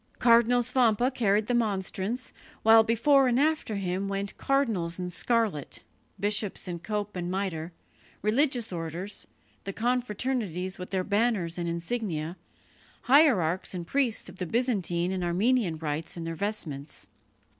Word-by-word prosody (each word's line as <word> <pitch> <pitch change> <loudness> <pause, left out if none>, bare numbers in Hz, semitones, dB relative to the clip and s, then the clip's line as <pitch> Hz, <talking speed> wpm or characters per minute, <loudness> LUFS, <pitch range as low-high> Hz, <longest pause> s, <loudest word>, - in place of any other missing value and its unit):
Cardinal 240 0 +5
Svampa 245 0 +2
carried 210 -3 +2
the 245 - -1
monstrance, 215 +1 -1 0.3
while 225 0 +8
before 255 +5 +4
and 245 0 +2
after 300 -7 +1
him 190 0 -2
went 195 0 -3
cardinals 225 -12 0
in 180 -1 -4
scarlet, 215 - -1 0.4
bishops 205 0 -1
in 175 -1 -4
cope 210 +2 -3
and 175 -1 -3
mitre, 180 -3 -3 0.5
religious 240 -1 +1
orders, 170 +4 -5 0.4
the 195 - -4
confraternities 220 -5 -2
with 180 - -6
their 190 -1 -1
banners 200 -5 0
and 170 -1 -2
insignia, 170 -2 -3 0.7
hierarchs 210 - +3
and 175 -1 -4
priests 255 +2 0
of 180 0 -11
the 180 - -3
Byzantine 190 -7 0
and 185 -1 -2
Armenian 185 +1 +1
rites 155 +1 -3
in 170 - -4
their 165 0 -3
vestments. 155 - -4
200 Hz, 135 wpm, -28 LUFS, 175-235 Hz, 0.7 s, while